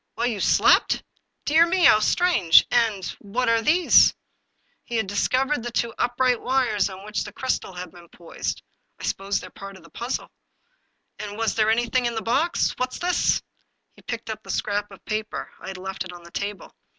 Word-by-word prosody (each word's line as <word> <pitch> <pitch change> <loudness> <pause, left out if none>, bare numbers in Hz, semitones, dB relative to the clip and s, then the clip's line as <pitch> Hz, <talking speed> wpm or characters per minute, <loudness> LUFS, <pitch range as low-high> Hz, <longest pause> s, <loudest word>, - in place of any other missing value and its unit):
"While 235 - -1
you 230 -4 -1
slept? - - +3 0.4
Dear 320 +3 +5
mel 355 0 +2
How 215 - +7
strange! 215 - +4
And— 225 -6 +1
what 235 +5 -2
are 230 0 +3
these? 330 +8 +5 0.3
" - - -44
He 240 - -5
had 220 -2 +1
discovered 255 +8 0
the 240 - -4
two 235 -1 -1
upright 245 0 +1
wires 250 -7 +1
on 190 +1 -10
which 210 0 -2
the - - -8
crystal 260 -7 -3
had 180 0 -7
been 175 -1 -16
poised. 170 -1 -6 0.2
'* - - -45
I - - -11
suppose 195 0 -1
they're - - -11
part 195 0 -10
of 175 - -18
the 165 - -17
puzzle." 240 +2 -4 0.9
"And 205 0 -6
was 225 -1 0
there 215 -1 +2
anything 240 +2 +1
in 235 - -3
the 225 - -3
box? 275 +9 +1
What's 255 0 -2
this?" 360 0 +1 0.5
He - - -18
picked 230 -1 -5
up 215 0 -7
the - - -16
scrap 205 0 -1
of 195 - -15
paper; 215 0 -4
I - - -10
had 190 - -6
left 190 +1 -5
it 185 - -9
on 175 -1 -12
the 170 - -14
table. 200 +1 -5
225 Hz, 200 wpm, -24 LUFS, 195-250 Hz, 0.9 s, How